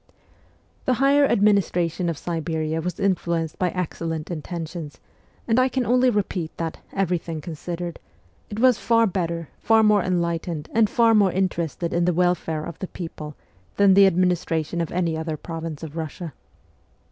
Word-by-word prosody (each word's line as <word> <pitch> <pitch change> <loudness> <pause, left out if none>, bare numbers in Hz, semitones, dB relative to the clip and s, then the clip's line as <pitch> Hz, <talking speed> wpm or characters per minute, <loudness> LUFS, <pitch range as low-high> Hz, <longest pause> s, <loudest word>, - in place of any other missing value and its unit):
The 255 - +2
higher 280 +3 +4
administration 180 -5 +2
of 165 - -3
Siberia 160 -1 -2
was 180 +2 -4
influenced 170 -5 -1
by 180 - +2
excellent 165 -2 -4
intentions, 165 -1 -6 0.5
and 230 +1 +3
I 255 +1 +4
can 255 -1 -1
only 250 +2 +4
repeat 195 -7 -2
that, 165 -1 -4
every 180 -3 0
thing 160 -1 -6
considered, 170 +2 -6 0.5
it 210 - -5
was 250 -2 +4
far 230 -1 +3
better, 170 -5 -2
far 225 -1 +4
more 210 -1 +5
enlightened, 170 -3 -2
and 225 -2 +4
far 230 0 +4
more 205 -4 +4
interested 170 -3 -1
in 170 0 +2
the 180 - +2
welfare 175 -3 0
of 170 -1 -8
the 190 - -4
people 155 -5 -7 0.4
than 200 -1 +6
the 195 0 +7
administration 175 -2 0
of 165 - -3
any 170 -2 0
other 160 -1 -3
province 165 -1 -6
of 160 -1 -7
Russia. 160 0 -5
175 Hz, 160 wpm, -23 LUFS, 165-200 Hz, 0.5 s, the